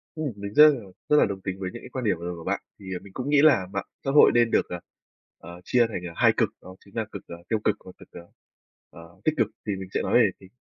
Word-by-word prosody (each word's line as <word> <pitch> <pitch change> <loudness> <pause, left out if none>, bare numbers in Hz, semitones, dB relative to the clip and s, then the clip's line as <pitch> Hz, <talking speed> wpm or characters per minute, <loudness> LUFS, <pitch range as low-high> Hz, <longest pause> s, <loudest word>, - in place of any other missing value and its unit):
Ừm, 155 -4 -3
mình 100 0 -7
rất 150 +1 +9
là 140 -4 0 0.3
rất 150 - +5
là - - +6
đồng 100 -1 -5
tính 95 0 -5
với 95 - -3
những 120 - -8
cái - - -10
quan 130 -2 -5
điểm 105 - +2
vừa 85 - -7
rồi 90 0 -4
của 85 - -10
bạn. - - -2 0.2
Thì, 100 - -13
à, 90 - -4
mình 100 - -14
cũng 130 +6 -4
nghĩ 145 -1 +5
là 135 -12 +5
mạng 100 - -3 0.2
xã 135 - +1
hội 145 - +7
nên 120 -1 +3
được, - - +2
ờ, 90 - -5 0.6
ờ, 85 +1 -12
chia 120 +4 +3
thành, 105 -5 -5
ờ, 85 - -9
2 - - +4
cực, - - +2
đó 95 - -12
chính 100 - -19
là 110 -2 -1
cực, 100 - -7
ờ, 85 - -8
tiêu 110 -2 +1
cực 105 - +2
và 95 - -10
cực, - - -15 0.8
ờ, 85 +2 -15
tích 155 - +2
cực. 115 - +3 0.2
Thì 100 - 0
mình 95 -1 -8
sẽ - - 0
nói - - -2
về 115 -4 +6
thì 95 - -15
100 Hz, 300 wpm, -25 LUFS, 95-125 Hz, 0.8 s, rất